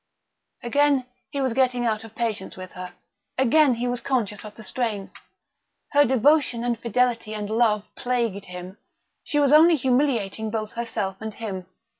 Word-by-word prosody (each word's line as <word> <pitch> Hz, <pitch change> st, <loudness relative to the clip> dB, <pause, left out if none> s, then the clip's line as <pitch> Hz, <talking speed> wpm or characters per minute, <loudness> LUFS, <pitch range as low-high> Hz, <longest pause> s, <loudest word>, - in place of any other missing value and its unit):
Again 280 Hz, +1 st, +2 dB, 0.2 s
he 280 Hz, -2 st, -3 dB
was 260 Hz, -3 st, 0 dB
getting 250 Hz, -1 st, +2 dB
out 220 Hz, -1 st, 0 dB
of 225 Hz, -1 st, -13 dB
patience 220 Hz, -6 st, -3 dB
with 185 Hz, 0 st, -8 dB
her; 180 Hz, 0 st, -8 dB, 0.4 s
again 265 Hz, +1 st, +4 dB
he 240 Hz, +2 st, -2 dB
was 245 Hz, 0 st, -1 dB
conscious 220 Hz, -7 st, -1 dB
of 210 Hz, -1 st, -10 dB
the 220 Hz, -, -10 dB
strain. 215 Hz, -5 st, -3 dB, 0.8 s
Her 290 Hz, 0 st, +5 dB
devotion 260 Hz, -1 st, +3 dB
and 240 Hz, -2 st, -1 dB
fidelity 235 Hz, -2 st, 0 dB
and 210 Hz, -1 st, -4 dB
love 220 Hz, -2 st, +2 dB
plagued 235 Hz, -5 st, -1 dB
him; 180 Hz, +2 st, -9 dB, 0.4 s
she 295 Hz, -, 0 dB
was 285 Hz, 0 st, +4 dB
only 325 Hz, +2 st, +7 dB
humiliating 245 Hz, -6 st, 0 dB
both 215 Hz, -1 st, -3 dB
herself 225 Hz, -5 st, -3 dB
and 220 Hz, -1 st, -5 dB
him. 190 Hz, -5 st, -5 dB
235 Hz, 160 wpm, -24 LUFS, 210-260 Hz, 0.8 s, only